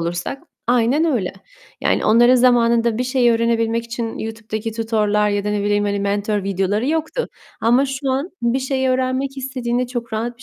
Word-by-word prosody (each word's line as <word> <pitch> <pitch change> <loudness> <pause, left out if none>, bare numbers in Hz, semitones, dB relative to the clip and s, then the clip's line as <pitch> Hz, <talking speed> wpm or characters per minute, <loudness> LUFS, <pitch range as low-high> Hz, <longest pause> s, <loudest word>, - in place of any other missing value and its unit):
olursak 175 - -4 0.3
Aynen 250 +6 +3
öyle 245 - 0 0.5
yani. - - +1
Onların 240 +3 +5
zamanında 235 -2 +3
bir 250 - 0
şeyi 250 -2 +3
öğrenebilmek 230 0 +1
için 235 -1 -5
YouTube'daki 220 0 -5
tutor'lar 215 -2 +1
ya 205 0 -1
da 210 - -1
ne 210 -1 -1
bileyim 205 0 +1
hani 200 0 -1
mentor 205 +1 -1
videoları 195 +5 0
yoktu 320 +10 -1 0.3
ama 245 +5 +3
şu 270 0 -3
an 275 +7 -1
bir 235 +2 +1
şeyi 265 0 -1
öğrenmek 260 +1 -1
istediğinde 250 -2 -2
çok 240 -2 -5
rahat 235 +2 -3
bir - - -14
235 Hz, 175 wpm, -20 LUFS, 215-255 Hz, 0.5 s, Onların